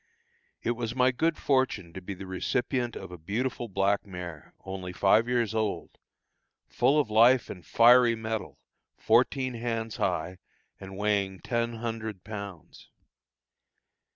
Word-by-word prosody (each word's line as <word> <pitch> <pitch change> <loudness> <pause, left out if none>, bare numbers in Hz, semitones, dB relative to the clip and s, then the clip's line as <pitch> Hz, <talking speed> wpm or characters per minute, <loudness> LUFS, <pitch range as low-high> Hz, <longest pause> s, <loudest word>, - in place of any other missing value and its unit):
It - - +1
was 120 0 -3
my 130 0 +4
good 160 +5 0
fortune 130 -11 0
to 95 - -7
be 100 +2 -6
the 95 +1 -9
recipient 120 +6 -2
of - - -8
a 90 - -9
beautiful 120 +8 -3
black 100 0 +1
mare, 90 -5 -9
only 95 -1 -6
five 105 +5 +3
years 120 -3 0
old, 110 -2 -3 0.7
full 135 +5 +2
of 130 -7 -1
life 120 +4 +5
and 90 - -10
fiery 120 0 +6
metal, 110 -1 -4 0.4
fourteen 130 +3 +2
hands 115 -1 -3
high, 90 0 -2 0.4
and 95 0 -9
weighing 100 -2 0
ten 115 -1 -1
hundred 110 -4 -5
pounds. 100 -6 -9
110 Hz, 135 wpm, -28 LUFS, 95-120 Hz, 0.7 s, fiery